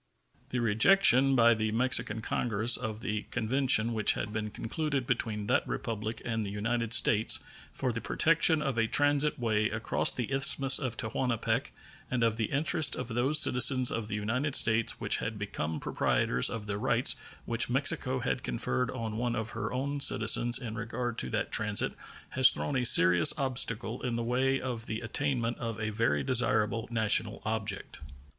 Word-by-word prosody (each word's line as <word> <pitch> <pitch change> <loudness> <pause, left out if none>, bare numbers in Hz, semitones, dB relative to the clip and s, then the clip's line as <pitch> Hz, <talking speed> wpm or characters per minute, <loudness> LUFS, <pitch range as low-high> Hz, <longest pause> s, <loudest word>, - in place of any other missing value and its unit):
The 125 - -5
rejection 130 - +3
by 120 -1 +3
the 110 -1 -4
Mexican 115 -2 0
Congress 115 +1 +1
of 110 0 -5
the 105 -1 -6
convention 120 -1 +1
which 110 -2 +2
had 105 - -7
been 105 -1 -5
concluded 140 +5 -5
between 110 -4 -4
that - - -2
Republic 110 0 -7
and 115 -2 -4
the 100 - -7
United 115 +3 -5
States 110 -2 +5 0.3
for 130 -3 -5
the 115 - -7
protection 160 -1 +1
of 135 -5 -4
a 115 - -1
transit 145 +3 +1
way 110 -3 -2
across 110 +1 +2
the 125 +1 -7
Isthmus 135 0 +6
of 130 -5 -6
Tehuantepec 120 0 -4 0.4
and 125 -2 -3
of 115 -1 -1
the 110 - -2
interests 145 +3 +1
of - - -8
those 125 +6 +1
citizens 125 -1 +5
of 115 -2 -6
the 105 - -6
United 125 +7 -3
States 115 0 +3
who - - -7
had 110 -1 -7
become 80 -6 -6
proprietors 65 - +1
of 110 -2 -7
the 100 0 -6
rights - - +3 0.3
which 115 +1 0
Mexico 130 0 0
had 125 0 -4
conferred 125 +1 -4
on 115 -4 -7
one 120 0 -4
of 110 -1 -6
her - - -7
own 140 +3 -5
citizens 120 -2 +5
in 115 -3 -7
regard 115 +1 -6
to - - +3
that 110 +1 -5
transit 105 -1 +1 0.4
has 130 -1 +5
thrown 145 - 0
a 125 -1 -2
serious 90 - +5
obstacle 120 -4 -1
in 125 -2 -5
the 115 - -5
way 130 +3 -2
of 120 -3 -8
the 110 +1 -6
attainment 120 0 -3
of 115 -2 -7
a 110 0 -5
very 105 -10 -2
desirable 110 - 0
national 110 -2 +1
object. 105 -2 -5
115 Hz, 175 wpm, -27 LUFS, 110-130 Hz, 0.4 s, Isthmus